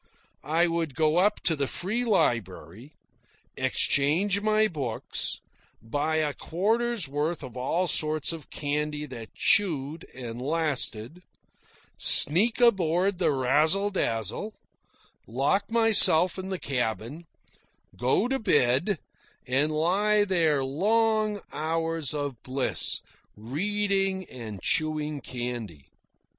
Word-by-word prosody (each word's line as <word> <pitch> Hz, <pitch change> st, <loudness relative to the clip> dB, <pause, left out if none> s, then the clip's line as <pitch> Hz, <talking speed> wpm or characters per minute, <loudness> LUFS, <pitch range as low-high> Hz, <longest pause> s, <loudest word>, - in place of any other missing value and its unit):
I 165 Hz, +3 st, +1 dB
would 165 Hz, -5 st, -3 dB
go 155 Hz, 0 st, +1 dB
up 200 Hz, +4 st, +2 dB
to 165 Hz, -, +1 dB
the 140 Hz, -2 st, -1 dB
Free 215 Hz, -, -2 dB
Library, 120 Hz, -, -2 dB, 0.6 s
exchange 180 Hz, +9 st, +1 dB
my 215 Hz, 0 st, +2 dB
books, 135 Hz, -, -2 dB, 0.4 s
buy 145 Hz, +8 st, -2 dB
a 155 Hz, -2 st, 0 dB
quarter's 220 Hz, +4 st, -1 dB
worth 150 Hz, +4 st, -3 dB
of 130 Hz, -2 st, -10 dB
all 150 Hz, +8 st, -1 dB
sorts 155 Hz, -2 st, +1 dB
of 160 Hz, -4 st, -9 dB
candy 150 Hz, 0 st, -3 dB
that 120 Hz, -5 st, -10 dB
chewed 160 Hz, -6 st, +1 dB
and 120 Hz, -2 st, -7 dB
lasted, 150 Hz, -2 st, -1 dB, 0.8 s
sneak 210 Hz, -, +5 dB
aboard 190 Hz, -4 st, +2 dB
the 180 Hz, -, +2 dB
Razzle 155 Hz, +10 st, +2 dB
Dazzle, 115 Hz, -, -3 dB, 0.7 s
lock 135 Hz, -, -1 dB
myself 210 Hz, -6 st, +6 dB
in 190 Hz, 0 st, -6 dB
the 190 Hz, -, -3 dB
cabin, 125 Hz, +3 st, -4 dB, 0.7 s
go 130 Hz, -, +1 dB
to 270 Hz, +1 st, -1 dB
bed, 170 Hz, -, +2 dB, 0.5 s
and 135 Hz, +4 st, +1 dB
lie 200 Hz, +7 st, +1 dB
there 160 Hz, -8 st, +1 dB
long 215 Hz, +7 st, 0 dB
hours 165 Hz, -2 st, -2 dB
of 145 Hz, -5 st, -5 dB
bliss, 130 Hz, +1 st, -1 dB, 0.3 s
reading 195 Hz, -, -1 dB
and 110 Hz, -6 st, -9 dB
chewing 155 Hz, -2 st, -1 dB
candy. 120 Hz, -, -7 dB
155 Hz, 110 wpm, -26 LUFS, 135-195 Hz, 0.8 s, myself